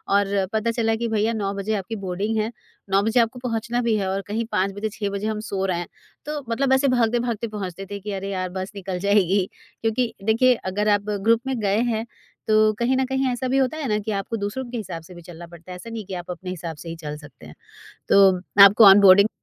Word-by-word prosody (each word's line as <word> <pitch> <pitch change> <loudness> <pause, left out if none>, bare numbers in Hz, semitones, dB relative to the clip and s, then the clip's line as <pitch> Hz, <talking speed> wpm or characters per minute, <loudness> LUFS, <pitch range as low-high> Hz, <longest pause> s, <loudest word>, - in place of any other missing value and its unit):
और 200 - +4 0.3
पता 225 +1 +1
चला 225 -1 0
कि 235 +1 -2
भईया 220 +1 +1
9 200 -2 -2
बजे 200 +2 -3
आपकी 205 +3 -4
बोर्डिंग 200 +5 -2
है। 215 +2 -1 0.4
9 195 +1 +3
बजे 225 +3 +2
आपको 235 +2 +1
पहुँचना 240 0 -2
भी 230 -2 +1
है 195 -2 -1
और 195 +1 -1
कहीं 225 +2 -2
5 195 +1 +1
बजे 210 +2 -3
6 205 -1 -4
बजे 200 +2 -3
हम 215 -1 -2
सो 195 -1 -1
रहे 180 -2 -1
हैं। 175 - -5 0.4
तो 295 -1 -4
मतलब 265 +3 +1
ऐसे 270 +1 +3
भागते-भागते 235 -2 0
पहुँचते 195 -3 -6
थे 200 - -4
कि, 205 +1 -6
"अरे 195 0 -4
यार, 185 -1 -3
बस 185 +2 -5
निकल 190 -2 -4
जाएगी।" 200 -1 +2 0.4
क्योंकि 225 +2 0
देखिए, 230 +4 +4
अगर 205 +1 -2
आप 205 0 +1 0.2
ग्रुप 230 0 +4
में 260 -3 -2
गए 205 +1 +1
हैं, 225 +1 -2 0.4
तो 215 0 +4
कहीं 255 +2 +1
न 265 - +1
कहीं 265 0 -1
ऐसा 250 +1 -3
भी 260 +2 +1
होता 270 +3 +1
है 290 -4 -3
ना 210 0 +1
कि 215 +1 -4
आपको 200 +3 -3
दूसरों 205 +6 -3
के 245 - -4
हिसाब 170 -6 -6
से 180 - -13
भी 175 - -11
चलना 170 0 -11
पड़ता 170 +1 -13
है। - - -6
ऐसा 205 +6 -10
नहीं 225 -3 -6
कि 195 - -8
आप 180 0 -5
अपने 180 +1 -7
हिसाब 170 -2 -5
से 165 - -9
ही 165 - -5
चल 150 -2 -7
सकते 145 - -15
हैं। 75 - -11 0.6
तो 195 -2 +6 0.3
आपको 210 +3 +7
ऑनबोर्डिंग 195 +1 +8
210 Hz, 245 wpm, -23 LUFS, 190-230 Hz, 0.6 s, ऑनबोर्डिंग